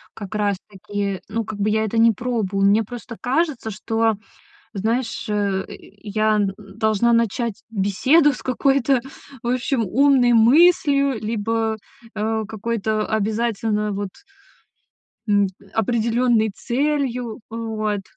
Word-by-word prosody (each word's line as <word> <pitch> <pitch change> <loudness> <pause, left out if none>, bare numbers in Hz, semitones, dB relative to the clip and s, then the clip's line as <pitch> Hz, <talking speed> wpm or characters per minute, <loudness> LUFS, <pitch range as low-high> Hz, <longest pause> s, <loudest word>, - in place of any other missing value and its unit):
как 205 -1 -8
раз 205 -2 +1
таки, 200 0 -4
ну, 225 +1 -2
как 215 -1 -7
бы 205 +1 +1
я 220 +1 +1
это 220 +1 -2
не 230 0 +6
пробую. 210 -4 -1
Мне 205 +3 +4
просто 240 +2 -8
кажется, 270 -2 0
что, 225 +2 0 0.6
знаешь, 225 +4 -2
э, 200 -2 0
я 215 +2 -2
н 200 -2 0
должна 215 +3 0
начать 230 -1 0
беседу 230 - +3
с - - -9
какой-то, 270 0 +2 0.4
в - - -4
общем, 245 -1 0
умной 255 +3 +4
мыслью 280 +1 +4
либо, 220 +1 -1 0.4
а, 220 +1 -1
какой-то 220 0 -2
обязательно 220 0 -1
вот 200 0 -3 1.2
м, 205 -1 +3 0.3
определенной 230 0 +2
целью. 250 -2 -1
Э, 225 - -6
вот. 215 -3 -2
220 Hz, 120 wpm, -21 LUFS, 210-240 Hz, 1.2 s, не